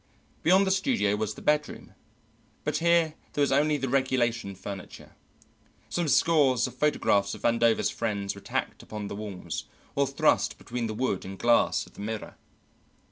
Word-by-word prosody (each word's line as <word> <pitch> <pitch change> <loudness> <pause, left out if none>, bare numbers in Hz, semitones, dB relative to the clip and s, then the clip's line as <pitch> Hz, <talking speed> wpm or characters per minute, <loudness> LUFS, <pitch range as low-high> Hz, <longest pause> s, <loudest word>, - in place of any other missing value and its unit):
Beyond 190 +4 +5
the 190 - +1
studio 190 - +1
was 105 0 -2
the - - -11
bedroom, 150 -8 -1 0.7
but 150 0 0
here 170 -1 +3 0.2
there 145 - +2
was 140 - +1
only 150 +2 +3
the 135 -1 -2
regulation 120 -6 0
furniture. 95 0 -9 0.8
Some 175 -2 -1
scores 140 -6 +4
of 125 - -5
photographs 115 -8 +1
of - - -13
Vandover's 115 -1 +3
friends 100 -4 -2
were 100 - -12
tacked - - -3
upon 105 -2 -6
the - - -5
walls, 95 -6 -5 0.3
or 140 0 +2
thrust 145 +3 +2
between 120 -1 -4
the 110 - -4
wood 115 -5 -1
and 95 +1 -7
glass 120 +2 +3
of - - -18
the - - -10
mirror. 110 +1 -5
120 Hz, 165 wpm, -27 LUFS, 105-150 Hz, 0.8 s, Beyond